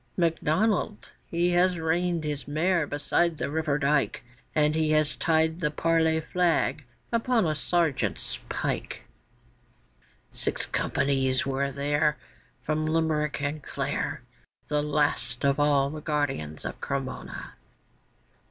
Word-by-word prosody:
MacDonnell 180 Hz, +5 st, +1 dB, 0.3 s
he 170 Hz, +1 st, +1 dB
has 180 Hz, 0 st, +3 dB
reined 165 Hz, +1 st, 0 dB
his 145 Hz, -2 st, -4 dB
mare 160 Hz, +2 st, +1 dB
beside 160 Hz, +3 st, +1 dB
the 140 Hz, -, -2 dB
river 155 Hz, -2 st, 0 dB
dyke, 145 Hz, -1 st, +1 dB, 0.3 s
And 150 Hz, -1 st, +3 dB
he 160 Hz, 0 st, +1 dB
has 155 Hz, -1 st, +2 dB
tied 160 Hz, 0 st, +2 dB
the 150 Hz, -4 st, +1 dB
parley 160 Hz, +1 st, +2 dB
flag 165 Hz, -3 st, +1 dB, 0.3 s
upon 230 Hz, -2 st, +2 dB
a 155 Hz, -, +1 dB
sergeant's 160 Hz, -2 st, -1 dB
pike; -, -, -3 dB, 1.3 s
Six -, -, -1 dB
companies 135 Hz, -2 st, +1 dB
were 140 Hz, 0 st, -1 dB
there 145 Hz, +2 st, +1 dB, 0.5 s
From 155 Hz, 0 st, 0 dB
Limerick 155 Hz, -3 st, 0 dB
and 145 Hz, +2 st, -2 dB
Clare, -, -, -3 dB, 0.5 s
The 150 Hz, 0 st, +2 dB
last 145 Hz, -4 st, 0 dB
of 140 Hz, +1 st, +2 dB
all 145 Hz, -1 st, +3 dB
the 155 Hz, 0 st, -6 dB
guardians 140 Hz, -, -2 dB
of -, -, -5 dB
Cremona. 135 Hz, -2 st, -4 dB
155 Hz, 120 wpm, -27 LUFS, 145-165 Hz, 1.3 s, has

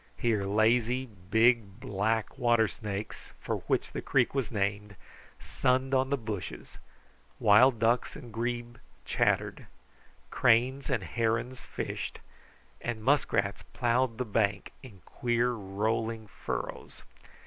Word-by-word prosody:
Here 110 Hz, -4 st, +1 dB
lazy, 115 Hz, +5 st, +2 dB
big, 110 Hz, +1 st, +1 dB
black 110 Hz, +1 st, -1 dB
water 120 Hz, -3 st, +4 dB
snakes, 100 Hz, +4 st, -6 dB
for -, -, -2 dB
which -, -, 0 dB
the -, -, -4 dB
creek -, -, +2 dB
was 135 Hz, -5 st, -1 dB
named, 100 Hz, -1 st, -2 dB, 0.4 s
sunned 130 Hz, +1 st, 0 dB
on 130 Hz, 0 st, +2 dB
the 140 Hz, -, +1 dB
bushes, 110 Hz, -6 st, -6 dB, 0.6 s
wild 120 Hz, +5 st, +6 dB
ducks 115 Hz, +2 st, +1 dB
and 120 Hz, -3 st, -10 dB
grebe 120 Hz, +1 st, -3 dB, 0.3 s
chattered, -, -, 0 dB, 0.6 s
cranes 130 Hz, +3 st, +3 dB
and 125 Hz, -7 st, 0 dB
herons 115 Hz, +6 st, -1 dB
fished, -, -, -5 dB, 0.6 s
and 115 Hz, -2 st, -4 dB
muskrats 110 Hz, -7 st, +1 dB
plowed 120 Hz, -1 st, +1 dB
the 125 Hz, -, -2 dB
bank 100 Hz, -2 st, 0 dB
in 110 Hz, -9 st, -13 dB
queer, 120 Hz, -1 st, 0 dB
rolling 110 Hz, +2 st, -2 dB
furrows. 95 Hz, -, -6 dB
115 Hz, 115 wpm, -29 LUFS, 105-125 Hz, 0.6 s, wild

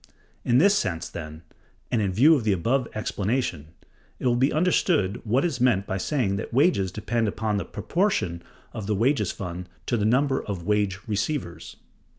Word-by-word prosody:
In 120 Hz, -, +3 dB
this 200 Hz, +8 st, +5 dB
sense, 85 Hz, -, -1 dB
then, 80 Hz, 0 st, -8 dB, 0.5 s
and 115 Hz, -, +2 dB
in 100 Hz, -2 st, 0 dB
view 135 Hz, -, +6 dB
of 140 Hz, -7 st, +1 dB
the 105 Hz, -2 st, +2 dB
above 120 Hz, +8 st, 0 dB
explanation, 105 Hz, -, -2 dB, 0.5 s
it -, -, -7 dB
will 120 Hz, -1 st, +3 dB
be 130 Hz, +4 st, +2 dB
understood 155 Hz, -, +1 dB
what 120 Hz, +8 st, +1 dB
is 140 Hz, -8 st, -2 dB
meant 115 Hz, -6 st, +3 dB
by 95 Hz, 0 st, -3 dB
saying 110 Hz, -6 st, 0 dB
that 105 Hz, -, -5 dB
wages 120 Hz, -, +2 dB
depend 110 Hz, +3 st, -1 dB
upon 105 Hz, 0 st, -1 dB
the 100 Hz, -, -3 dB
proportion 170 Hz, -, -1 dB, 0.3 s
of 100 Hz, -3 st, -6 dB
the 105 Hz, -, +1 dB
wages 115 Hz, -2 st, +1 dB
fund 90 Hz, -1 st, -6 dB, 0.2 s
to 120 Hz, -, 0 dB
the 105 Hz, -, -1 dB
number 135 Hz, +4 st, +2 dB
of 100 Hz, -4 st, -5 dB
the -, -, -12 dB
wage 105 Hz, -2 st, +1 dB
receivers. 105 Hz, -, -3 dB
110 Hz, 180 wpm, -25 LUFS, 95-130 Hz, 0.5 s, view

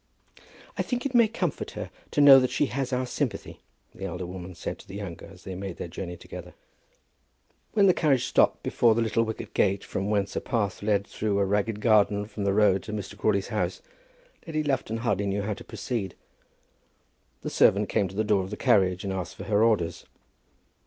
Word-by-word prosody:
"I -, -, +4 dB
think 250 Hz, 0 st, -3 dB
it 275 Hz, -, -2 dB
may 235 Hz, -2 st, +6 dB
comfort 225 Hz, -, -3 dB
her -, -, -5 dB, 0.2 s
to 145 Hz, -, +1 dB
know 140 Hz, -2 st, +10 dB
that 130 Hz, -1 st, +1 dB
she -, -, +1 dB
has 135 Hz, 0 st, -3 dB
our 130 Hz, 0 st, 0 dB
sympathy," -, -, -3 dB, 0.3 s
the 95 Hz, -, -7 dB
elder 90 Hz, -1 st, -4 dB
woman 90 Hz, 0 st, -8 dB
said -, -, -5 dB
to -, -, -15 dB
the 95 Hz, -, -9 dB
younger 100 Hz, -5 st, -7 dB
as 95 Hz, -1 st, -15 dB
they 95 Hz, -, -6 dB
made 95 Hz, -1 st, -6 dB
their -, -, -5 dB
journey 90 Hz, +1 st, -6 dB
together. -, -, -10 dB, 1.2 s
When 205 Hz, -2 st, +5 dB
the 185 Hz, -, +6 dB
carriage 140 Hz, -8 st, +2 dB
stopped -, -, +2 dB
before 115 Hz, -2 st, +3 dB
the 115 Hz, -, +1 dB
little 115 Hz, 0 st, +1 dB
wicket 110 Hz, -1 st, -4 dB
gate, 100 Hz, 0 st, +2 dB
from 100 Hz, +2 st, -3 dB
whence 100 Hz, -2 st, 0 dB
a -, -, -1 dB
path 110 Hz, -6 st, -2 dB
led 100 Hz, -1 st, +1 dB
through 105 Hz, -1 st, -2 dB
a 100 Hz, -, +2 dB
ragged 105 Hz, +2 st, 0 dB
garden 105 Hz, -2 st, +3 dB
from 105 Hz, -1 st, -5 dB
the 100 Hz, -, +2 dB
road 100 Hz, -3 st, +4 dB
to 105 Hz, -, -7 dB
Mr. 105 Hz, -1 st, -5 dB
Crawley's 100 Hz, -1 st, 0 dB
house, -, -, -2 dB, 0.6 s
Lady 155 Hz, -1 st, -1 dB
Lufton 135 Hz, -6 st, -1 dB
hardly 100 Hz, -2 st, +1 dB
knew 100 Hz, +1 st, -1 dB
how 105 Hz, +1 st, -1 dB
to -, -, -10 dB
proceed. 110 Hz, -7 st, -4 dB, 1.3 s
The -, -, -4 dB
servant -, -, +4 dB
came 100 Hz, -, +1 dB
to 95 Hz, -, -11 dB
the 110 Hz, -, +1 dB
door 105 Hz, -2 st, +2 dB
of 95 Hz, -, -7 dB
the 105 Hz, -, -6 dB
carriage, 95 Hz, -2 st, +3 dB
and 95 Hz, -1 st, -2 dB
asked 90 Hz, -2 st, -5 dB
for -, -, -8 dB
her 105 Hz, +1 st, +2 dB
orders. 105 Hz, -8 st, +1 dB
105 Hz, 205 wpm, -27 LUFS, 95-115 Hz, 1.3 s, know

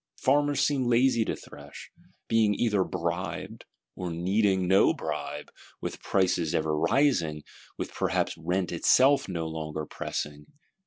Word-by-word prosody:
Farmers 145 Hz, +1 st, +2 dB
seem 140 Hz, -3 st, +1 dB
lazy 120 Hz, -1 st, +3 dB
to -, -, -2 dB
thresh;—being 105 Hz, +8 st, -3 dB
either 105 Hz, -4 st, +1 dB
"bribed;" 85 Hz, 0 st, -4 dB, 0.3 s
or 90 Hz, -1 st, -4 dB
needing 95 Hz, +2 st, +1 dB
no 95 Hz, +2 st, +4 dB
bribe, 75 Hz, 0 st, -5 dB, 0.3 s
with -, -, -6 dB
prices 90 Hz, -4 st, +1 dB
ever 80 Hz, -1 st, 0 dB
rising, 80 Hz, -, +1 dB, 0.3 s
with -, -, -5 dB
perhaps -, -, 0 dB
rent 90 Hz, +3 st, -2 dB
itself 130 Hz, +10 st, +4 dB
no 85 Hz, -3 st, -3 dB
longer 80 Hz, -1 st, -4 dB
so -, -, -12 dB
pressing. 75 Hz, 0 st, -5 dB
90 Hz, 125 wpm, -27 LUFS, 80-115 Hz, 0.3 s, no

